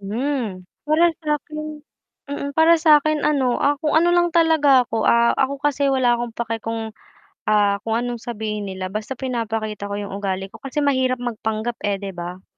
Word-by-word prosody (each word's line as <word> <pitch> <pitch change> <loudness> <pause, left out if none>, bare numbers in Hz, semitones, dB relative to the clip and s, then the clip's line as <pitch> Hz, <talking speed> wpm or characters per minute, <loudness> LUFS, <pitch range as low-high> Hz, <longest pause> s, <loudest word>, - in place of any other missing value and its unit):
Hmm. 225 -1 -3 0.2
Para 310 +3 +4 0.2
sa'kin 305 +1 -3 0.5
mm, 285 0 -4
para 320 +3 +5
sa'kin 310 -1 +4
ano, 265 -5 +2
ah, 285 -1 +1
kung 305 0 +1
ano 345 +2 +4
lang 345 0 +3
talaga 315 -6 +4
ako. 225 -1 -1
Ah, 235 0 +4
ako 275 +1 0
kasi 285 0 0
wala 260 -3 +3
akong 235 -1 -5
pake 230 -1 -3
kung, 225 0 -4 0.6
ah, 205 -1 +3
kung 225 +1 -2
anong 240 -1 -3
sabihin 210 -3 -4
nila 185 0 -5
basta 220 +4 -4
pinapakita 225 -5 -3
ko 200 - -3
yung 200 -1 -5
ugali 195 -1 -3
ko - - -13
kasi 280 +2 -2
mahirap 260 -2 +2
magpanggap 225 -1 -3
eh, 200 -1 0
'di 195 0 -6
ba? 175 +1 -7
240 Hz, 175 wpm, -21 LUFS, 215-290 Hz, 0.6 s, para